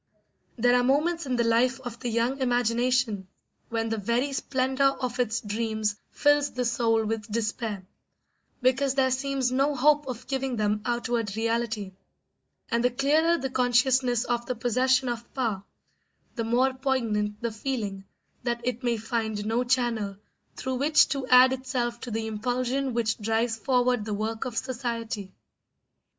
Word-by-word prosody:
There 245 Hz, +1 st, +4 dB
are 245 Hz, -, +3 dB
moments 300 Hz, +5 st, +1 dB
in 255 Hz, -, 0 dB
the 240 Hz, -, +2 dB
life 240 Hz, +3 st, +2 dB
of 240 Hz, -2 st, -7 dB
the 245 Hz, -, -3 dB
young 235 Hz, +4 st, 0 dB
imagination 245 Hz, -4 st, +1 dB, 0.4 s
when 225 Hz, -1 st, -1 dB
the 225 Hz, -1 st, -1 dB
very 240 Hz, +7 st, 0 dB
splendour 265 Hz, 0 st, +1 dB
of 250 Hz, -1 st, -4 dB
its 240 Hz, -1 st, 0 dB
dreams 215 Hz, -1 st, -1 dB
fills 290 Hz, -1 st, +3 dB
the 250 Hz, 0 st, -3 dB
soul 225 Hz, -1 st, +1 dB
with 220 Hz, 0 st, -3 dB
despair, 215 Hz, -3 st, -2 dB, 0.8 s
because 265 Hz, +1 st, +2 dB
there 260 Hz, -1 st, +3 dB
seems 265 Hz, -1 st, 0 dB
no 275 Hz, +3 st, +2 dB
hope 295 Hz, +2 st, +3 dB
of 245 Hz, -3 st, -6 dB
giving 265 Hz, -2 st, -2 dB
them 210 Hz, -1 st, 0 dB
outward 235 Hz, -3 st, -1 dB
reality; 225 Hz, -3 st, -1 dB, 0.8 s
and 235 Hz, 0 st, +1 dB
the 245 Hz, -, +4 dB
clearer 300 Hz, +7 st, +2 dB
the 265 Hz, -3 st, -4 dB
consciousness 250 Hz, -1 st, +2 dB
of 240 Hz, -1 st, -2 dB
the 250 Hz, -, -2 dB
possession 255 Hz, +3 st, +2 dB
of 235 Hz, -1 st, -4 dB
power, 225 Hz, -7 st, -1 dB, 0.7 s
the 230 Hz, -3 st, -3 dB
more 250 Hz, +3 st, +2 dB
poignant 230 Hz, -6 st, -1 dB
the 235 Hz, -1 st, -2 dB
feeling 210 Hz, -4 st, -4 dB, 0.4 s
that 235 Hz, -1 st, -2 dB
it 250 Hz, 0 st, -2 dB
may 240 Hz, -2 st, 0 dB
find 220 Hz, -1 st, -2 dB
no 230 Hz, +3 st, +1 dB
channel 240 Hz, -6 st, 0 dB, 0.4 s
through 260 Hz, 0 st, -3 dB
which 295 Hz, +3 st, +4 dB
to 275 Hz, -2 st, -2 dB
add 255 Hz, +1 st, +7 dB
itself 250 Hz, -2 st, -2 dB
to 245 Hz, -, -7 dB
the 225 Hz, 0 st, -2 dB
impulsion 250 Hz, +4 st, -1 dB
which 225 Hz, -1 st, 0 dB
drives 225 Hz, +2 st, 0 dB
forward 245 Hz, -1 st, +1 dB
the 210 Hz, -1 st, -2 dB
work 220 Hz, +3 st, -3 dB
of 245 Hz, -3 st, -5 dB
society. 230 Hz, -6 st, -3 dB
240 Hz, 155 wpm, -27 LUFS, 225-260 Hz, 0.8 s, add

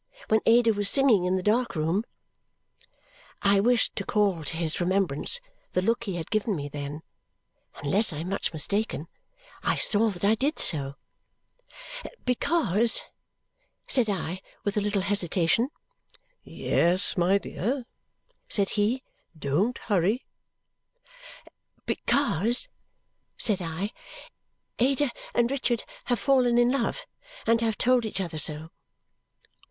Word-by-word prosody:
When 220 Hz, -, +4 dB
Ada 230 Hz, 0 st, +5 dB
was 205 Hz, -1 st, +2 dB
singing 245 Hz, -9 st, +4 dB
in 180 Hz, +1 st, +1 dB
the 185 Hz, -, -2 dB
dark 230 Hz, +2 st, +1 dB
room?" 165 Hz, +8 st, 0 dB, 1.4 s
I 200 Hz, 0 st, +4 dB
wished 240 Hz, +3 st, +2 dB
to 200 Hz, -, -2 dB
call 195 Hz, -6 st, +1 dB
to 160 Hz, -, -5 dB
his 165 Hz, -2 st, 0 dB
remembrance 185 Hz, -, +1 dB, 0.3 s
the 185 Hz, -, +2 dB
look 235 Hz, +3 st, 0 dB
he 195 Hz, -4 st, -3 dB
had 165 Hz, -2 st, -6 dB
given 215 Hz, -1 st, 0 dB
me 145 Hz, -2 st, -5 dB
then. 145 Hz, +2 st, -6 dB, 0.8 s
Unless 195 Hz, +10 st, +4 dB
I 150 Hz, -, -6 dB
am 165 Hz, +4 st, -4 dB
much 200 Hz, -, -2 dB
mistaken, 170 Hz, +1 st, -1 dB, 0.5 s
I -, -, +1 dB
saw 220 Hz, +1 st, +3 dB
that 180 Hz, -3 st, -7 dB
I 210 Hz, -, +5 dB
did 275 Hz, +8 st, 0 dB
so. 140 Hz, -3 st, 0 dB, 1.3 s
"Because 235 Hz, -, +2 dB, 0.4 s
" -, -, -45 dB
said 250 Hz, -5 st, +3 dB
I 185 Hz, -1 st, -3 dB, 0.2 s
with 205 Hz, +1 st, -2 dB
a 210 Hz, -, +1 dB
little 200 Hz, -1 st, 0 dB
hesitation. 200 Hz, -, +2 dB, 0.7 s
"Yes, 180 Hz, +4 st, +1 dB
my 180 Hz, +2 st, +3 dB
dear!" 240 Hz, +6 st, -3 dB, 0.6 s
said 200 Hz, -2 st, +1 dB
he. 220 Hz, +5 st, 0 dB, 0.3 s
"Don't 160 Hz, -, 0 dB
hurry." 205 Hz, +4 st, 0 dB, 1.6 s
"Because," 235 Hz, -, +1 dB, 0.7 s
said 205 Hz, -4 st, +2 dB
I, 175 Hz, +5 st, -3 dB, 0.9 s
"Ada 270 Hz, +2 st, +2 dB, 0.2 s
and 240 Hz, +1 st, +2 dB
Richard 250 Hz, -4 st, 0 dB, 0.2 s
have 245 Hz, -, +1 dB
fallen 250 Hz, -3 st, +3 dB
in 240 Hz, 0 st, +4 dB
love. 275 Hz, -, -1 dB, 0.4 s
And 230 Hz, 0 st, +3 dB
have 225 Hz, -2 st, 0 dB
told 250 Hz, -1 st, +3 dB
each 215 Hz, -3 st, -4 dB
other 170 Hz, -4 st, -3 dB
so." 155 Hz, +2 st, 0 dB
205 Hz, 130 wpm, -27 LUFS, 175-235 Hz, 1.6 s, Ada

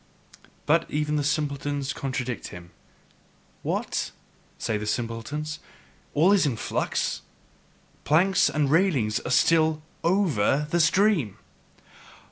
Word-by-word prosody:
But 165 Hz, +2 st, +2 dB
even 150 Hz, 0 st, -1 dB
the 145 Hz, -, 0 dB
simpletons 145 Hz, -1 st, -1 dB
contradict 130 Hz, -3 st, -4 dB
him. 85 Hz, -1 st, -11 dB, 0.9 s
"What?" -, -, -2 dB, 0.5 s
say 110 Hz, -, -2 dB
the 105 Hz, 0 st, -3 dB
simpletons, 120 Hz, +8 st, -3 dB, 0.6 s
"all 165 Hz, +6 st, +5 dB
in 160 Hz, -, +3 dB
flux? -, -, -2 dB, 0.8 s
Planks 185 Hz, +6 st, +3 dB
and 145 Hz, -2 st, 0 dB
railings 145 Hz, -, +2 dB
are -, -, -6 dB
still 155 Hz, +3 st, +3 dB, 0.2 s
OVER 155 Hz, -, +2 dB
the 175 Hz, -, +2 dB
stream! 165 Hz, -, +3 dB
150 Hz, 100 wpm, -26 LUFS, 125-165 Hz, 0.9 s, all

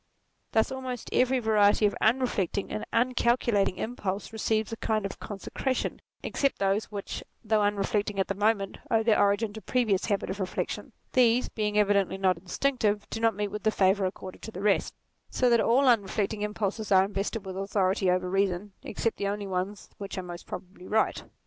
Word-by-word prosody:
Thus 220 Hz, +3 st, +3 dB
almost 260 Hz, -2 st, -5 dB
every 255 Hz, +1 st, +3 dB
variety 215 Hz, -3 st, +4 dB
of 205 Hz, -, +2 dB
unreflecting 220 Hz, -5 st, +1 dB
and 215 Hz, -, -3 dB
uncalculating 235 Hz, -5 st, +2 dB
impulse 205 Hz, -2 st, -4 dB
receives 220 Hz, 0 st, 0 dB
a 225 Hz, -, -4 dB
kind 215 Hz, -2 st, -1 dB
of 195 Hz, -, -6 dB
consecration, 235 Hz, +6 st, -3 dB, 0.2 s
except 275 Hz, -1 st, 0 dB
those 195 Hz, +2 st, +1 dB
which, 205 Hz, -2 st, -6 dB
NATURE -, -, -7 dB, 0.2 s
45 215 Hz, -, -19 dB
though 215 Hz, -1 st, +4 dB
unreflecting 205 Hz, 0 st, 0 dB
at 190 Hz, -, +1 dB
the -, -, -1 dB
moment, 205 Hz, -1 st, 0 dB
owe 225 Hz, -1 st, +3 dB
their 220 Hz, -1 st, +3 dB
origin 205 Hz, +1 st, +2 dB
to 220 Hz, -, -8 dB
previous 220 Hz, -7 st, +1 dB
habits 200 Hz, -3 st, -1 dB
of 190 Hz, -, -5 dB
reflection: 190 Hz, -2 st, -3 dB, 0.2 s
these, 245 Hz, -1 st, +4 dB
being 210 Hz, -1 st, -1 dB
evidently 200 Hz, -2 st, +3 dB
not 185 Hz, -3 st, +2 dB
instinctive, 210 Hz, +2 st, 0 dB
do 225 Hz, -, -3 dB
not 225 Hz, -2 st, +2 dB
meet 205 Hz, 0 st, -2 dB
with 210 Hz, -, -4 dB
the 220 Hz, -, +2 dB
favour 195 Hz, -1 st, +3 dB
accorded 185 Hz, 0 st, -8 dB
to 220 Hz, -, -7 dB
the 190 Hz, -1 st, -7 dB
rest; 205 Hz, -2 st, +2 dB, 0.3 s
so 250 Hz, -1 st, +2 dB
that 235 Hz, -1 st, +5 dB
all 260 Hz, +4 st, +3 dB
unreflecting 210 Hz, -2 st, +1 dB
impulses 210 Hz, 0 st, -2 dB
are 190 Hz, 0 st, +6 dB
invested 200 Hz, +1 st, -3 dB
with 190 Hz, -1 st, -6 dB
authority 195 Hz, -1 st, +1 dB
over 180 Hz, 0 st, +1 dB
reason, 195 Hz, +1 st, 0 dB
except 230 Hz, +2 st, -2 dB
the 200 Hz, -, -1 dB
only 205 Hz, 0 st, -2 dB
ones 190 Hz, +2 st, -4 dB
which 200 Hz, 0 st, -6 dB
are 185 Hz, -, -3 dB
most 175 Hz, -1 st, -9 dB
probably 185 Hz, 0 st, -8 dB
right. 220 Hz, 0 st, +1 dB
205 Hz, 185 wpm, -28 LUFS, 195-225 Hz, 0.3 s, are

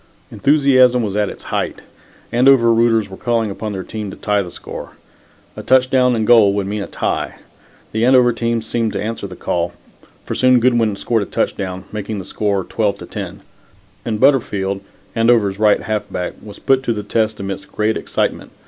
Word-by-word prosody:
Enthusiasm 130 Hz, -4 st, +4 dB
was 100 Hz, -2 st, -3 dB
at 105 Hz, -1 st, +1 dB
its -, -, -10 dB
height. -, -, -2 dB, 0.5 s
Andover 120 Hz, -1 st, +5 dB
rooters 115 Hz, -2 st, +3 dB
were 95 Hz, -1 st, -10 dB
calling 115 Hz, -3 st, 0 dB
upon 105 Hz, +2 st, -5 dB
their 95 Hz, -2 st, -4 dB
team 105 Hz, 0 st, -6 dB
to -, -, -9 dB
tie 105 Hz, -1 st, 0 dB
the 90 Hz, -, -6 dB
score. -, -, -9 dB, 0.6 s
A -, -, -6 dB
touchdown 130 Hz, -1 st, +3 dB
and 110 Hz, -1 st, 0 dB
goal 110 Hz, -4 st, +6 dB
would 100 Hz, -1 st, -1 dB
mean 105 Hz, +1 st, -3 dB
a -, -, -5 dB
tie. -, -, -2 dB, 0.6 s
The 110 Hz, +1 st, -1 dB
Andover 125 Hz, -1 st, +5 dB
team 115 Hz, -1 st, -1 dB
seemed 115 Hz, 0 st, -1 dB
to -, -, -2 dB
answer 110 Hz, -2 st, -4 dB
their 90 Hz, -, -11 dB
call, 85 Hz, 0 st, -2 dB, 0.5 s
for -, -, -4 dB
soon 130 Hz, -1 st, +4 dB
Goodwin 115 Hz, -4 st, +2 dB
scored 115 Hz, +2 st, 0 dB
a 100 Hz, -, -4 dB
touchdown, 95 Hz, -1 st, -2 dB
making 105 Hz, 0 st, -4 dB
the 95 Hz, -, -6 dB
score 100 Hz, -1 st, -1 dB
12 105 Hz, +1 st, -1 dB
to -, -, -9 dB
10, -, -, -7 dB, 0.6 s
and 110 Hz, -2 st, -2 dB
Butterfield, 100 Hz, -8 st, +2 dB, 0.3 s
Andover's 115 Hz, -4 st, +2 dB
right 105 Hz, -1 st, +3 dB
halfback, 105 Hz, -5 st, -3 dB
was 105 Hz, -1 st, -11 dB
put 135 Hz, -1 st, +2 dB
to 120 Hz, -3 st, -1 dB
the 105 Hz, -1 st, -5 dB
test 110 Hz, +1 st, -1 dB
amidst 100 Hz, 0 st, -6 dB
great 110 Hz, +1 st, 0 dB
excitement. -, -, -2 dB
110 Hz, 185 wpm, -18 LUFS, 100-120 Hz, 0.6 s, goal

